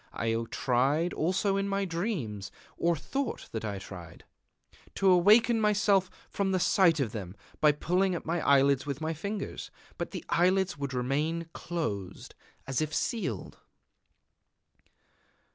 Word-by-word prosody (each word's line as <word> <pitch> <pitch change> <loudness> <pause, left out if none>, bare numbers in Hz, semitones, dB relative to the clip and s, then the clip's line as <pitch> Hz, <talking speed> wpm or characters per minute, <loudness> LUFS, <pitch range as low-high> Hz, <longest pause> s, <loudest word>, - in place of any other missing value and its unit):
I 115 0 -1 0.2
tried 140 +7 +1
also 190 +4 +1
in 195 0 0
my 195 0 0
dreams 165 - -3 0.2
or 170 0 +1
thought 270 - -4
that 110 - -4
I 100 -2 -3
tried 90 -4 -10 0.7
to 195 - +1
awaken 220 +6 +5
myself 205 -3 +3 0.2
from 195 -1 -1
the 185 - +1
sight 175 -3 +4
of 125 -6 0
them 100 -4 -6 0.2
by 150 - +6
pulling 180 +5 +1
at - - -6
my 170 +1 -1
eyelids 140 -1 +4
with 140 -1 -3
my 160 +1 -2
fingers; 200 +6 -5 0.3
but - - -2
the - - -7
eyelids 185 +2 +2
would 140 -2 -4
remain 150 +7 -1
closed, 105 - -4 0.3
as 135 0 -1
if 155 0 -1
sealed.... 170 - -3
165 Hz, 140 wpm, -29 LUFS, 130-195 Hz, 0.7 s, by